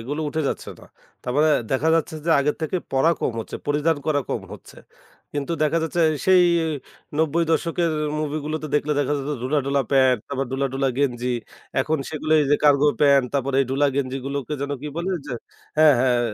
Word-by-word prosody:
এগুলো 145 +7 -4
উঠে 160 +2 -2
যাচ্ছে - - -4
না। - - -14 0.4
তারমানে 150 +5 +2 0.2
দেখা 135 +5 +1
যাচ্ছে 160 -1 0
যে, 170 - 0
আগের 145 +1 +1
থেকে 160 +4 -1 0.2
পড়া 135 +5 +4
কম - - 0
হচ্ছে, - - -7
পরিধান 150 +2 +1
করা 145 -2 +2
কম - - -2
হচ্ছে। - - -13 0.6
কিন্তু 145 +3 -2
দেখা 155 +2 +2
যাচ্ছে 165 +2 -1 0.3
সেই 185 -1 +6 0.7
৯০ 160 +2 +2
দশকের 170 +1 0 0.3
মুভি 155 0 -2
গুলোতে 155 0 -3
দেখলে 150 +1 +1
দেখা 145 +1 0
যাচ্ছে 145 +2 -3
ধুলা 145 +4 +1
ঢোলা 140 0 +1
প্যান্ট 130 -3 +4
তারপর 135 -1 -2
ঢুলা, 135 +1 0
ঢুলা 135 0 +1
গেঞ্জি। 125 -3 0 0.5
এখন 155 +3 0
সেগুলো 155 0 -2
এই - - +2
যে, 145 - +5
কার্গো 145 0 +5
প্যান্ট 140 -3 +5
তারপরে 135 0 0
এই - - -4
ঢুলা 140 +2 +2
গেঞ্জি 135 -1 -1
গুলোকে 140 0 -4
যেন 140 0 -3
কি 150 - -4
বলে 175 +3 -2 0.2
যে 125 - -4 0.4
হ্যাঁ, 155 -2 +7
হ্যাঁ, 125 -2 +3
145 Hz, 190 wpm, -23 LUFS, 135-155 Hz, 0.7 s, হ্যাঁ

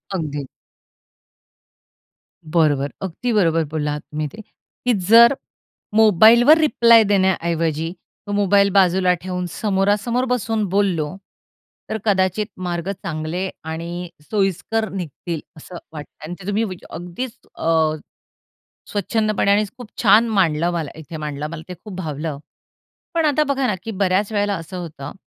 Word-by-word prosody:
अगदी. 145 -5 -3 2.1
बरोबर. 145 -4 +2
अगदी 195 +6 -3
बरोबर 165 -6 +3
बोलला 150 -1 -1
आहात 150 0 -4
तुम्ही 150 +1 -4
ते, 220 - -9
की 245 +3 -5
जर 235 +4 +8 0.6
मोबाईलवर 220 - +7
रिप्लाय 235 -7 +6
देण्याऐवजी 170 -5 +1 0.4
तो 205 - -4
मोबाईल 200 0 +4
बाजूला 185 -1 +4
ठेवून 180 -1 -3
समोरासमोर 205 +6 0
बसून 225 -3 0
बोललो, 185 -5 0 0.7
तर 220 - -1
कदाचित 190 0 +1
मार्ग 175 0 -3
चांगले 170 0 -4
आणि 170 +2 -5 0.2
सोयीस्कर 205 +2 0
निघतील 170 -2 -5 0.2
असं 175 +3 -10 0.2
वाटतं 150 -1 -10
आणि 170 - -6
ते 185 - -10
तुम्ही 205 +2 +1
वी 185 -5 -4
अगदीच 220 +9 -6 0.2
अ, 160 -1 +1 1.0
स्वच्छंदपणे 215 0 0
आणि 210 +1 +3
खूप 245 -3 -9
छान 220 +2 +6
मांडलं, 175 -6 +2
मला 165 -4 -3
इथे 160 +1 -8
मांडलं 150 -1 -4
मला 165 -1 -7
ते 180 - -6
खूप 210 -3 -8
भावलं. 155 -3 -4 0.8
पण 330 -1 +2
आता 300 +1 +3
बघा 275 -2 0
ना, 210 - +1
की 225 - -5
बऱ्याच 200 +1 0
वेळेला 205 -1 +1
असं 165 +2 -8
होतं, 155 -5 -7
185 Hz, 135 wpm, -21 LUFS, 165-215 Hz, 2.1 s, जर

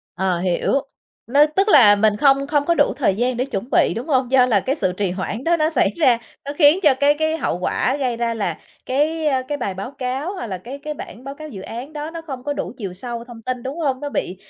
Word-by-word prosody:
Ờ, 185 -1 0
hiểu. 180 -1 0 0.5
Nó 285 +5 +5
tức 385 +7 0
là 230 - +7
mình 210 0 +2
không 275 +3 +3
không 290 -1 +1
có 340 - +3
đủ 290 - +3
thời 250 -9 +2
gian 245 +4 0
để 250 - 0
chuẩn 245 -2 -5
bị, - - +3
đúng 250 +7 -5
hông? 260 -3 +1
Do 255 -2 +5
là 215 -5 +3
cái 265 +8 -1
sự 185 - 0
trì 190 0 -1
hoãn 195 +6 -4
đó 340 +1 +3
nó 310 0 +1
xảy 255 -10 +2
ra, 255 -8 +4 0.3
nó 285 - -4
khiến 300 +3 +6
cho 295 -6 +5
cái 285 +1 +5
cái 315 0 +1
hậu 230 - -2
quả 255 +8 0
gây 255 -4 -1
ra 230 0 -1
là 210 -3 -2 0.3
cái, 310 +4 0
ơ, 265 -3 +2
cái 290 -1 -2
bài 200 -6 -3
báo 195 +7 -6
cáo 270 +5 -3
hoặc 300 - -5
là 190 -3 -5
cái 255 +9 -8
cái 300 +1 -6
bản 250 -3 -10
báo 275 +1 -6
cáo 310 +1 -9
dự 195 -9 -8
án 245 +9 -7
đó 300 +1 -5
nó 330 0 -7
không 270 -6 -7
có 290 - -1
đủ - - -4
chiều 200 -7 -5
sâu 235 +5 -6
thông 235 -2 -12
tin, 250 +1 -4
đúng 270 +5 -5
hông? 275 -5 -1
Nó 290 - -3
bị 190 -8 -3
260 Hz, 270 wpm, -21 LUFS, 230-295 Hz, 0.5 s, là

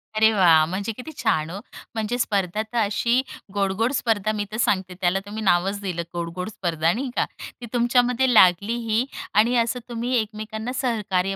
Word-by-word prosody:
अरे 220 0 +5
वाह! 165 -6 +5
म्हणजे 195 +6 -3
किती 255 +5 -8
छान 160 -10 0
हो. 195 +3 -6 0.4
म्हणजे 220 +2 -1
स्पर्धा 200 -4 0
तर 220 +2 -6
अशी 230 +4 +2 0.3
गोड-गोड 200 +4 0
स्पर्धा 215 -4 +1
मी 205 -1 -2
तर 215 - -4
सांगते, 190 -5 0
त्याला 180 +2 +2
तुम्ही 210 +2 -6
नावच 190 +2 +2
दिलं 180 -4 -3
गोड-गोड 175 +3 -4
स्पर्धा, 165 -5 0
नाही 255 +3 -3
का. - - +3 0.4
ती 240 - -6
तुमच्यामध्ये 245 +1 +2
लागलीही 220 +4 +3 0.3
आणि 225 +4 +4
असं 235 +2 +1
तुम्ही 240 +2 -2
एकमेकांना 220 +2 -4
सहकार्य 195 -6 0
215 Hz, 165 wpm, -23 LUFS, 190-235 Hz, 0.4 s, अरे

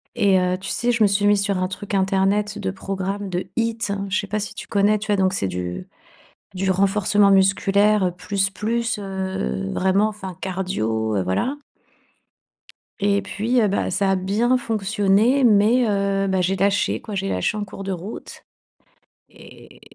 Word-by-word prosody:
et 200 -5 +3
heu, 180 0 0
tu - - -7
sais 245 0 0
je 225 -1 -1
me - - +6
suis 200 +1 +1
mise 205 -1 +4
sur 200 -2 0
un 185 0 0
truc 200 +2 -7
internet 195 +2 +1
de 190 -2 -2
programmes 195 +1 -4
de 180 +1 -3
HIIT. 230 0 0 0.3
Je 205 - +1
sais 200 - -5
pas 210 +1 -2
si 210 - -5
tu - - -9
connais, 205 +1 +2
tu 215 - -7
vois 205 - +2
donc 190 0 +2
c'est 100 - -1
du 90 -1 -5 0.7
du 190 0 0
renforcement 200 +1 +3
musculaire 195 0 +3
plus, 195 +1 -1
plus, 230 +3 -2
heu, 190 - -3
vraiment, 190 +3 +2
enfin, 190 -5 -7
cardio 110 - -2
heu, - - +1
voilà. 95 - -1 1.4
Et 200 0 +2
puis, 235 +4 0
heu, 215 - +3
bah, 200 - -1
ça 195 +1 +1
a - - +3
bien 210 +7 +1
fonctionné 215 +3 +1
mais 225 +2 +4
heu, 195 -1 0
bah, 190 -1 +1
j'ai 185 +2 0
lâché 200 +2 +1
quoi. 210 - -7
J'ai 195 0 -2
lâché 90 - -1
en 205 - -3
cours 195 0 -9
de 195 - -4
route 185 +4 -8 0.8
et - - -16
195 Hz, 180 wpm, -22 LUFS, 190-210 Hz, 1.4 s, me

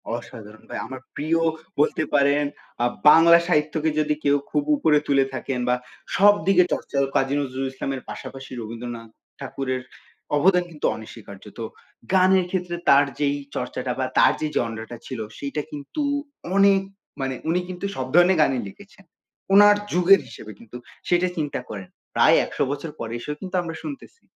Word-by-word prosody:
অসাধারণ 110 -2 -10
ভাই। - - -5
আমার 130 0 -8 0.2
প্রিয় 160 +3 0 0.4
বলতে 150 +1 +2
পারেন 145 +1 +3 0.4
আ - - +3 0.2
বাংলা 170 +2 +8
সাহিত্যকে 155 -1 +1
যদি 150 0 +1
কেউ 145 0 +3 0.2
খুব 295 - +1
উপরে 155 - +3
তুলে 140 -1 +3
থাকেন 130 0 -3
বা 125 - +4 0.4
সব 205 +1 +7
দিকে 180 -2 +6
চর্চা 140 - -4 0.2
কাজী 135 +1 +2
নজরুল 135 -1 -3
ইসলামের 135 0 -4
পাশাপাশি 135 0 -8
রবীন্দ্রনাথ 115 0 -7 0.3
ঠাকুরের 130 -2 -3 0.6
অবদান 180 +3 +4
কিন্তু 150 - -5
অনস্বীকার্য। 110 -3 -11 0.2
তো - - -3 0.5
গানের 185 -1 +4
ক্ষেত্রে 180 -2 -2
তার 140 +1 +7
যেই 145 0 +1 0.2
চর্চাটা 125 0 -3
বা 130 - +1
তার - - +6
যেই 155 -1 -2
জনরাটা 115 0 -3
ছিল 130 -3 -6 0.2
সেইটা 145 +1 -3
কিন্তু 145 - -6 0.5
অনেক 200 -1 +5 0.4
মানে 135 -1 -2
উনি 175 +2 +2
কিন্তু 180 +2 -5
সব 130 - -3
ধরণের 175 +1 +5
গানই 135 -5 +2
লিখেছেন। 195 - -17 0.5
উনার 205 +1 +8 0.2
যুগের 180 +3 +5
হিসেবে 115 -2 -10
কিন্তু 115 +1 -11 0.3
সেটা 175 +1 +2
চিন্তা 145 -4 -2
করেন। 95 -3 -7 0.3
প্রায় - - +6
১০০ - - -2
বছর 145 +3 -4
পরে 115 0 -5
এসেও 150 +4 -5
কিন্তু 185 -1 -5
আমরা 165 -2 -6
শুনতেছি। 310 - -9
145 Hz, 160 wpm, -23 LUFS, 130-175 Hz, 0.6 s, বাংলা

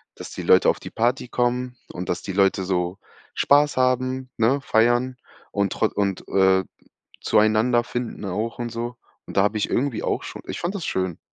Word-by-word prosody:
dass - - -9
die - - -6
Leute - - +5
auf - - 0
die - - -8
Party 120 +2 0
kommen 125 +1 -1
und 90 - -6
dass 90 - -1
die 95 - -5
Leute 95 0 +2
so 90 +1 -1 0.4
Spaß 145 -1 +4
haben, 130 0 +1
ne, 120 +5 +3
feiern 120 +1 +2 0.3
und 100 -1 0
tro 110 - +2
und, 100 -2 -1
äh, 95 -1 +4 0.6
zueinander 110 +3 +3
finden 120 -3 -5
auch 110 +5 -3
und 120 -1 -3
so. 120 +1 -4 0.3
Und - - -9
da 95 - +5
habe 105 +2 +1
ich 105 - -1
irgendwie 130 -3 0
auch - - -1
schon - - -8
ich - - -5
fand 175 +4 -2
das 185 - -4
schön. 95 -3 -2
115 Hz, 190 wpm, -23 LUFS, 100-125 Hz, 0.6 s, Leute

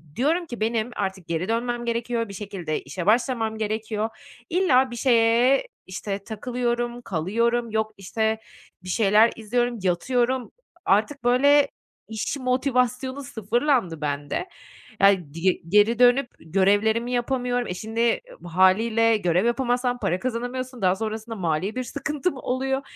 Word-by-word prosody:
diyorum 325 +7 +1
ki: 240 -7 -8
"Benim 225 +1 0
artık 190 -3 -4
geri 170 +3 -2
dönmem 240 +1 -1
gerekiyor, 235 -1 -2
bir - - -8
şekilde 190 -6 -4
işe 170 +6 -6
başlamam 225 0 +1
gerekiyor." 220 0 -2 0.4
İlla 265 -8 +3
bir - - -5
şeye, 240 - +3 0.2
işte, 195 +1 -5
takılıyorum, 240 +2 -2
kalıyorum, 230 +6 0
yok, 220 0 0
işte, 220 +3 -1 0.4
bir 185 - -8
şeyler 215 +3 +4
izliyorum, 240 +2 -1
yatıyorum. 245 +7 0 0.3
Artık, 220 +9 +1
böyle, 280 +4 +5 0.4
iş 220 +5 -3
motivasyonu 255 +1 0
sıfırlandı 230 - 0
bende. 145 - -3 0.5
Ya, 190 -7 +4
dige 170 +3 +2 0.2
geri 210 +4 +4
dönüp 245 +2 +5
görevlerimi 205 +7 +1
yapamıyorum. 245 0 -1
E, - - -3
şimdi 225 +4 0 0.3
hâliyle 220 +6 +3
görev 180 +1 +1
yapamazsan 245 0 0
para 190 -4 0
kazanamıyorsun. 250 +1 -4
Daha 185 0 +4
sonrasında 220 +2 -5
mali 180 +2 -1
bir 255 - -2
sıkıntım 300 +5 -3
oluyor. 265 +1 -1
230 Hz, 130 wpm, -24 LUFS, 200-250 Hz, 0.5 s, böyle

